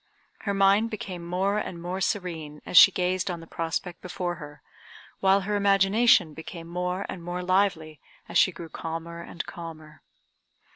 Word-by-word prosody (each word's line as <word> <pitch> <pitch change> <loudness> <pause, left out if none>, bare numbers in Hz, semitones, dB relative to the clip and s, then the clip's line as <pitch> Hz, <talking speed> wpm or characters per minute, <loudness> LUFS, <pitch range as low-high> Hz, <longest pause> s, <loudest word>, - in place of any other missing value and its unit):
Her - - +2
mind 195 +3 +4
became 190 -5 -6
more 190 +4 0
and 175 -4 -5
more 180 +3 -4
serene 165 -7 -3
as - - -6
she 195 - +10
gazed 185 0 -1
on 175 -2 -3
the 165 - -11
prospect 165 +2 -4
before 180 -1 -4
her, 145 -1 -11 0.6
while 195 +1 +4
her 205 +2 -2
imagination 200 - +4
became 165 +2 -9
more 180 +2 -2
and 175 - -7
more 175 +1 -4
lively 180 -5 +1 0.3
as - - +2
she 185 - +5
grew 165 -1 -9
calmer 165 +1 -6
and 170 - -6
calmer. 155 -2 -10
180 Hz, 160 wpm, -26 LUFS, 165-195 Hz, 0.6 s, she